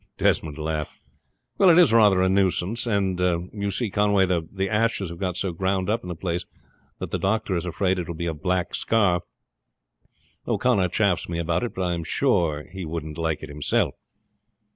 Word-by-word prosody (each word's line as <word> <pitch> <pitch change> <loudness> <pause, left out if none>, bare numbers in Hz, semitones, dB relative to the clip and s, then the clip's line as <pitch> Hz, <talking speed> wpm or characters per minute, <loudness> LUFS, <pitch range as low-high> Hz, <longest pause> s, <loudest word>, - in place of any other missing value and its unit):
Desmond 75 -2 +1
laughed. 75 -1 -4 0.6
"Well, 195 - +7
it 170 - +6
is 165 -10 +6
rather 105 -5 +5
a - - +3
nuisance; 95 +4 +1
and 100 -4 0 0.3
you 100 -1 -2
see 110 +1 -2
Conway, 100 -1 +3
the 95 +2 -2
ashes 110 -3 0
have 85 0 -9
got 90 -2 -2
so 95 0 -1
ground 95 +3 -1
up 115 +2 0
in 90 - -9
the 90 - -4
place 85 +1 -3 0.5
that - - -6
the - - -1
doctor 105 0 0
is 85 +1 -2
afraid 95 +2 0
it 85 - -4
will 85 - -5
be 85 - -4
a 85 - -1
black 90 +4 -1
scar. 100 -6 +2 1.3
O'Connor 100 -8 +2
chaffs 95 -2 +1
me 85 - -2
about 85 +1 0
it, 120 - -4
but 95 - -2
I 90 -1 0
am 85 -1 -3
sure 85 - +1
he 95 +3 -8
wouldn't 80 -1 -5
like 80 -2 -1
it - - -7
himself." 75 0 0
95 Hz, 190 wpm, -24 LUFS, 85-100 Hz, 1.3 s, Well